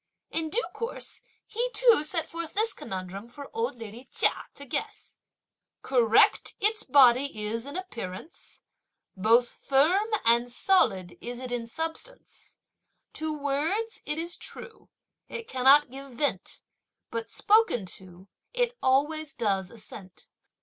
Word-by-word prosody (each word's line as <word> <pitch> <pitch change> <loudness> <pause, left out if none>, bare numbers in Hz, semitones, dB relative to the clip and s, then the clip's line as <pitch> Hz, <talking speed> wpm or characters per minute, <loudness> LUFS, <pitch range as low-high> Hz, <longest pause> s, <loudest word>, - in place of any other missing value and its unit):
In 320 -1 -1
due 465 +8 0
course 465 +1 -6 0.2
he 475 +3 -2
too 470 -11 +5
set 325 +1 -1
forth 335 0 -6
this 440 +2 +2
conundrum 190 +4 -7
for 280 +3 -10
old 455 - -1
lady 230 +3 -10
Chia - - +1
to 280 - -9
guess: 255 - -5 0.7
Correct 235 -4 +3
its 430 +1 +2
body 265 - +5
is 230 +4 -3
in 285 - -5
appearance, 240 - -8 0.5
Both 230 +5 +4
firm 320 - +2 0.2
and 235 +1 +4
solid 200 - +1
is 245 0 -5
it 255 -1 -6
in 240 -1 -3
substance; 325 - -6 0.6
To 315 0 -3
words, 305 +10 -1
it 300 - -1
is 340 +2 -3
true, 450 - -6 0.4
it 465 - -6
cannot 265 +2 +5
give 275 0 -10
vent, 240 -7 -2 0.5
But 230 -1 -4
spoken 425 - +3
to, 185 0 -15 0.3
it - - +1
always 295 +3 +1
does 195 -5 0
assent. 205 -4 -11
275 Hz, 130 wpm, -27 LUFS, 230-345 Hz, 0.7 s, too